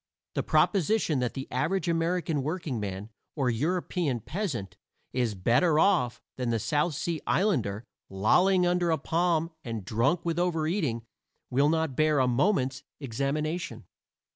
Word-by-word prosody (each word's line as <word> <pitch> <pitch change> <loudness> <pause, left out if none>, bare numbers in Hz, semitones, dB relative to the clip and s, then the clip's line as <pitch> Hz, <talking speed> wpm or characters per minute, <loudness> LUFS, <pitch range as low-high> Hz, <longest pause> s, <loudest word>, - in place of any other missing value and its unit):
The - - 0
proposition 195 -6 +2
that 125 -1 -2
the 135 0 -5
average 165 +8 0
American 165 -2 0
workingman 115 - -4 0.2
or 135 -5 +1
European 155 0 -1
peasant 135 - -4 0.4
is 120 -5 0
"better 125 - +3
off" 160 -9 +3 0.2
than 125 -2 -1
the 115 - +1
South 145 +8 0
Sea 165 +2 -2
islander, 120 - +1 0.3
lolling 180 - +3
under 175 -1 +1
a 160 - +2
palm 165 +2 0
and 115 -5 -5
drunk 135 - +1
with 170 0 0
over 170 -3 +1
eating, 150 - -1 0.5
will 140 +4 +3
not 160 -4 0
bear 155 +1 +3
a 130 -2 +3
moment's 135 - +1 0.2
examination. 145 +6 -3
150 Hz, 140 wpm, -28 LUFS, 125-175 Hz, 0.5 s, better